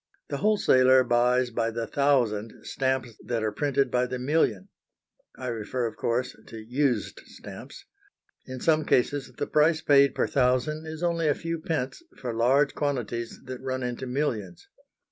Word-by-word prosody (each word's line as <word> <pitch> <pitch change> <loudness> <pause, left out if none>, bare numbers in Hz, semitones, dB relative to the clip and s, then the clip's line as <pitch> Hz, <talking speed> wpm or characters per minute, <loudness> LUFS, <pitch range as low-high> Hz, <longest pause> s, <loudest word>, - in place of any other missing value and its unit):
The 140 - -2
wholesaler 130 -9 +4
buys 125 +1 +2
by 115 0 0
the 115 0 -3
thousand 120 -7 0
stamps 130 -4 -1
that 115 -2 -2
are 110 - 0
printed 140 +3 0
by 125 0 +1
the 125 0 -4
million. 125 - 0 0.7
I 130 - -7
refer, 120 +2 -3
of 115 - -4
course, 120 +2 -1
to 115 - -9
used 120 0 -1
stamps. - - -11 0.6
In 130 -1 -7
some 155 -1 +3
cases 140 0 +1
the - - -1
price 155 +1 +3
paid 140 -1 +4
per - - +1
thousand 135 +4 0
is 160 +2 -6
only 170 -2 +1
a 145 - +3
few 165 0 -4
pence 155 - -3 0.2
for 120 -2 -4
large 130 +5 +3
quantities 120 -5 -3
that 130 -1 -7
run 130 -1 -3
into 125 +1 -4
millions. 115 - -3
130 Hz, 160 wpm, -26 LUFS, 120-145 Hz, 0.7 s, wholesaler